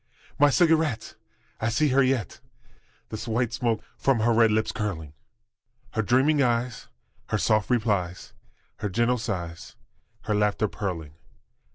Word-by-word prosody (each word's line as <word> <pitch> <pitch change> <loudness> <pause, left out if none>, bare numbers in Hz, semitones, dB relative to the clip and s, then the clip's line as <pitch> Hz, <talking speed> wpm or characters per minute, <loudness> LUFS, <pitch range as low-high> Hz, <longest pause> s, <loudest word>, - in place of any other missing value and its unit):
My 145 - +6
cigarette! 155 - +2 0.5
I 110 - 0
see 150 +6 +2
her 135 +1 +4
yet, 130 -7 0 0.7
The 110 - -5
white 115 +1 0
smoke 115 -3 -1 0.2
from 135 -5 +2
her 115 +1 +3
red 115 0 +5
lips 110 +1 +1
curling, 90 -9 -4 0.8
Her 110 - 0
dreaming 135 +7 +3
eyes, 120 -2 0 0.4
her - - 0
soft 110 -1 +1
replies, 105 -7 -1 0.4
Her 105 0 -3
gentle 120 +5 +1
sighs, 90 -7 -5 0.5
her 105 - -2
laughter 105 +1 +1
purling! 85 -8 -5
110 Hz, 135 wpm, -26 LUFS, 105-125 Hz, 0.8 s, My